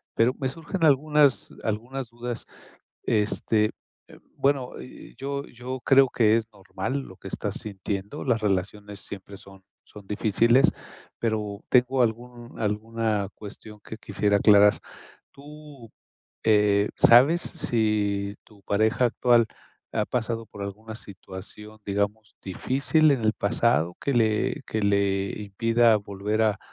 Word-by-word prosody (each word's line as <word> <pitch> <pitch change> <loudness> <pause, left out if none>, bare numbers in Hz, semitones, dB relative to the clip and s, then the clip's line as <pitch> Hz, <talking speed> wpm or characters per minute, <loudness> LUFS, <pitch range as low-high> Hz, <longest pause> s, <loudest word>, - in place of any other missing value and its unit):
Pero 115 +3 +3
me 130 -2 -1
surgen 165 +5 -5
algunas 150 -1 +3
algunas 120 +4 -4
dudas. 120 0 -6 0.6
Este, 105 0 +1 0.4
eh, - - -15 0.2
bueno, 135 -2 0
eh, - - -12
yo 140 +1 -4
yo 125 +2 -7
creo 135 -1 +6
que 110 -2 +3
es 115 -1 -1
normal 100 +6 -4
lo 95 -8 -11
que - - -14
estás - - -4
sintiendo, 100 +4 -5
las 120 -4 +1
relaciones 100 +1 -2
siempre 100 0 -9
son 95 -1 -15 0.2
son 105 -2 -14
difíciles, 115 +5 +3 0.5
pero 105 -3 -2
tengo 125 +1 +3
algún 120 +1 -4
alguna 110 -1 -1
cuestión 105 0 -11
que 110 - -8
quisiera 100 0 0
aclarar. 105 -1 +6 0.5
Tú, 145 -4 -13 0.5
eh, 105 -1 +3
¿sabes 135 +9 +6
si 105 - -1
tu 105 -2 -21
pareja 110 +4 +2
actual 120 -1 +3 0.5
ha 105 - 0
pasado 115 -1 -2
por 100 -1 -8
alguna 110 +3 -7
situación, 105 +1 -11
digamos 100 +2 -2
difícil 135 - +1
en 135 -4 0
el 110 - +3
pasado 100 -5 +1
que 140 - -1
le 110 -3 +1
que 110 - -2
le 100 -1 +1
impida 115 +3 +3
volver 100 +2 -3
a 110 -1 +1
110 Hz, 130 wpm, -25 LUFS, 100-125 Hz, 0.6 s, creo